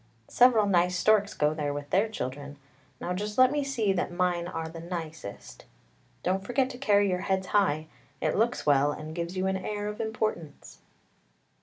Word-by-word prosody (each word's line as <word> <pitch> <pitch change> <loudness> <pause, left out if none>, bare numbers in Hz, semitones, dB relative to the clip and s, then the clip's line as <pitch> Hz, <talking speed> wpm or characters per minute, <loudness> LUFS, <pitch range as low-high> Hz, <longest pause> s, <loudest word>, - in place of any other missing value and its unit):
Several 240 -4 +5
nice 180 -2 +2
storks 210 -1 +3
go 150 +1 +2
there 145 -2 -2
with 145 0 -7
their 200 +4 +3
children; 145 -6 -6 0.4
now 180 - -3
just 210 +3 -4
let 255 0 +6
me 290 0 0
see 230 -8 0
that 180 -1 -2
mine 175 -1 0
are 165 -2 -4
the 165 +1 -9
nicest. 165 - -7 0.6
Don't 190 +1 0
forget 255 +5 0
to 250 - -10
carry 205 -6 +3
your 180 -1 0
heads 190 -1 0
high; 180 -6 +1 0.3
it - - 0
looks 230 +3 0
well, 145 0 +4
and 155 +1 -7
gives 170 +2 -4
you 185 - 0
an 190 0 0
air 205 +2 -4
of 210 +1 -4
importance." 215 -8 -4
185 Hz, 180 wpm, -28 LUFS, 160-210 Hz, 0.6 s, let